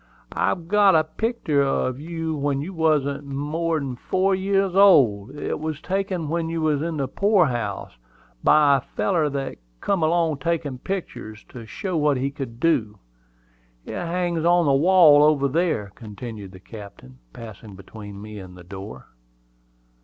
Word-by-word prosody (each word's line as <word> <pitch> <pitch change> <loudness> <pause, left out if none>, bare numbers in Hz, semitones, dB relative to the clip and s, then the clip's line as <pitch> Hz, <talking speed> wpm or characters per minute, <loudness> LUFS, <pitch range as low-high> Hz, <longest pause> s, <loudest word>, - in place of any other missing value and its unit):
"I've 170 -2 -1
got 200 -1 +4
a 155 - +4
picter 170 -4 -1
of 135 -2 0
you 165 0 -4
when 140 -1 -1
you 170 +7 -5
wasn't 150 -4 +1
more'n 145 0 -2
four 185 +9 0
year 195 +1 +1
old. 130 - +5
It 145 - -4
was 155 -1 -4
taken 185 -2 -2
when 165 +1 -2
you 165 0 -3
was 155 -3 +1
in 165 0 -3
the 135 -2 -1
poor 200 - +3
house, 120 -7 -3 0.5
by 145 -2 +5
a - - -4
feller 165 -1 -1
that 135 -1 -4 0.2
come 195 -3 0
along 160 -2 +1
taking 150 -4 -2
picters, 125 - -6
to 115 -3 -10
show 185 - -4
what 150 -2 +2
he 135 +2 -2
could 130 -5 -7
do. 125 -11 +1 0.9
It - - -7
hangs 175 -1 -2
on 175 0 +4
the 140 - +3
wall 155 0 +6
over 150 -2 +3
here," 110 - -2
continued 105 -2 -9
the 95 - -12
captain, 100 - -12
passing 110 - -11
between 100 +1 -11
me 105 0 -9
and 90 -1 -11
the 90 - -12
door. 95 +3 -9
150 Hz, 160 wpm, -23 LUFS, 120-170 Hz, 0.9 s, wall